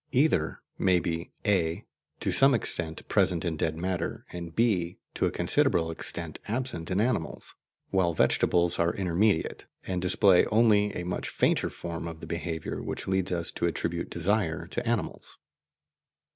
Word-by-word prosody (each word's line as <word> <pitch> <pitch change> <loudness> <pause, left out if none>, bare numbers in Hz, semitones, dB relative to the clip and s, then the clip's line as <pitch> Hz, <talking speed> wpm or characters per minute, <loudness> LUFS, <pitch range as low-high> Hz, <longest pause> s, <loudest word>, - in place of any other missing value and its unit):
Either 125 - +2 0.2
may 95 -2 +4
be 85 0 -3
(a) 85 -5 +1 0.3
to - - -1
some 135 0 +5
extent 80 -7 -2
present 90 -2 +2
in 85 -2 -1
dead 80 0 -1
matter, 90 0 -3
and 85 -2 -7
(b) 95 -7 +1 0.2
to - - +1
a - - -1
considerable 80 0 +1
extent 80 -1 -4
absent 110 -7 -3
in 95 +1 +1
animals, 110 -7 -1 0.4
while 95 -3 +2
vegetable 85 +1 +2
are 85 0 +2
intermediate, 95 0 +1 0.2
and 90 -1 -2
display 90 0 +5
only 105 -2 +4
a 90 - -3
much 90 - -3
fainter - - +1
form 85 -1 -6
of 80 -1 -7
the - - -8
behaviour 80 -1 -4
which - - -5
leads 95 -1 +1
us 85 -2 -1
to - - -1
attribute 85 0 -2
desire 85 -2 0
to 120 +7 -4
animals. 115 -8 -3
90 Hz, 155 wpm, -28 LUFS, 85-100 Hz, 0.4 s, some